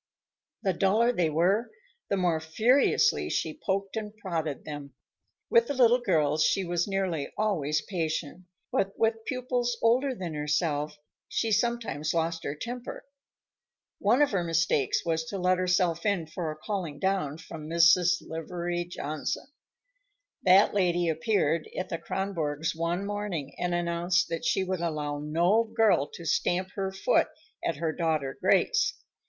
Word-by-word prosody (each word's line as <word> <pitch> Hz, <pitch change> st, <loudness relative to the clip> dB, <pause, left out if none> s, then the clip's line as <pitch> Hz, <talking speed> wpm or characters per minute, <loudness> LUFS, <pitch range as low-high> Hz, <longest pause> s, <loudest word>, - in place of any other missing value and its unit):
The 190 Hz, -3 st, +2 dB
duller 210 Hz, +7 st, +3 dB
they 175 Hz, -9 st, +1 dB
were, 185 Hz, +9 st, +2 dB, 0.4 s
the 200 Hz, -, +1 dB
more 175 Hz, -4 st, +1 dB
furiously 240 Hz, -, +2 dB
she -, -, -2 dB
poked 195 Hz, +1 st, -1 dB
and 215 Hz, -1 st, -5 dB
prodded 165 Hz, -8 st, -3 dB
them. 145 Hz, -3 st, -7 dB, 0.5 s
With 235 Hz, 0 st, +4 dB
the 285 Hz, -, -2 dB
little 245 Hz, -1 st, +5 dB
girls 155 Hz, -7 st, +2 dB
she 195 Hz, -, +2 dB
was 175 Hz, 0 st, -1 dB
nearly 190 Hz, -7 st, -2 dB
always 155 Hz, -9 st, 0 dB
patient, 170 Hz, -1 st, -3 dB, 0.3 s
but 195 Hz, 0 st, 0 dB
with 225 Hz, 0 st, +1 dB
pupils 250 Hz, -2 st, -1 dB
older 255 Hz, +4 st, +2 dB
than 180 Hz, -6 st, -5 dB
herself, 150 Hz, 0 st, -1 dB, 0.3 s
she 225 Hz, -, -1 dB
sometimes 225 Hz, -, 0 dB
lost 165 Hz, 0 st, -1 dB
her 145 Hz, -, -2 dB
temper. 245 Hz, +8 st, -6 dB, 0.9 s
One 235 Hz, +8 st, +4 dB
of 290 Hz, -, +1 dB
her 190 Hz, -4 st, 0 dB
mistakes 165 Hz, -4 st, +1 dB
was 165 Hz, -1 st, 0 dB
to 195 Hz, -, -5 dB
let 185 Hz, 0 st, +2 dB
herself 180 Hz, -2 st, +1 dB
in 200 Hz, -6 st, +1 dB
for 160 Hz, +1 st, -4 dB
a -, -, -7 dB
calling 170 Hz, -3 st, -4 dB
down 185 Hz, -4 st, -1 dB
from 160 Hz, -2 st, -9 dB
Mrs. 170 Hz, +2 st, +4 dB
Livery 175 Hz, +1 st, -3 dB
Johnson. 155 Hz, -, -4 dB, 1.0 s
That 190 Hz, +2 st, +5 dB
lady 175 Hz, -3 st, +2 dB
appeared 160 Hz, -1 st, 0 dB
at 185 Hz, -, -3 dB
the 165 Hz, -, -3 dB
Kronborgs' 160 Hz, -6 st, -2 dB
one 170 Hz, +4 st, -1 dB
morning 205 Hz, -9 st, -4 dB
and 175 Hz, 0 st, 0 dB
announced 175 Hz, +3 st, +1 dB
that 165 Hz, -1 st, -3 dB
she 190 Hz, -, +2 dB
would 185 Hz, -2 st, -2 dB
allow 150 Hz, -3 st, -2 dB
no 170 Hz, +9 st, +2 dB
girl 220 Hz, -10 st, +2 dB
to 170 Hz, -, -9 dB
stamp 180 Hz, +4 st, +1 dB
her 195 Hz, -1 st, -2 dB
foot 190 Hz, -, +2 dB, 0.4 s
at 165 Hz, -, 0 dB
her 160 Hz, +2 st, -1 dB
daughter 155 Hz, -5 st, -1 dB
Grace. -, -, +3 dB
175 Hz, 150 wpm, -28 LUFS, 160-200 Hz, 1.0 s, little